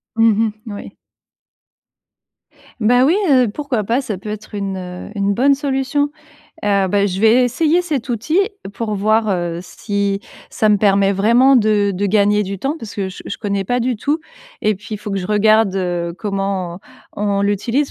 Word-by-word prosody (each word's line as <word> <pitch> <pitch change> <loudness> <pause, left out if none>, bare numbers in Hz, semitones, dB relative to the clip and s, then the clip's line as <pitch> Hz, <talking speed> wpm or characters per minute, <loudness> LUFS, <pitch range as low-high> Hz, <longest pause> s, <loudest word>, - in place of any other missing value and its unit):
Mmh 225 -1 +4
mh, - - -3
mouais. 205 -3 -8 1.8
Bah 245 +3 +4
oui, 320 +6 +4
heu, 255 -4 +5
pourquoi 275 -6 -2
pas? 235 +6 0
Ça 215 -7 -4
peut 200 +3 -8
être 210 0 -7
une 190 -1 -5
une 200 0 +1
bonne 275 +3 +4
solution. 275 0 0 0.6
Heu, 200 -2 +2
bah, 200 +1 +2
je 190 -1 -3
vais 225 +3 +5
essayer 310 +7 +2
cet 295 -8 -3
outil 240 - 0 0.4
pour 220 -2 -3
voir, 215 +2 +2
heu, 175 -2 -2
si 200 0 -2 0.3
ça 215 - +1
me 210 - +5
permet 200 -1 +3
vraiment 235 +7 +4
de 210 -3 +2
de 200 +3 -1
gagner 205 +1 +3
du 195 0 -5
temps. 275 - -2
Parce 225 -6 -9
que 195 -2 -2
je 185 - -10
je - - -5
connais 200 -2 -2
pas 245 +5 0
du 245 -1 0
tout, 295 +8 -1 0.4
et 215 0 +2
puis, 215 +3 -8
il 210 - -5
faut 210 - -7
que 195 - -1
je 180 - -4
regarde 215 -1 +3 0.4
comment 195 -4 -3 0.4
on 200 -1 0
l'utilise, 230 +8 0
210 Hz, 180 wpm, -18 LUFS, 200-245 Hz, 1.8 s, heu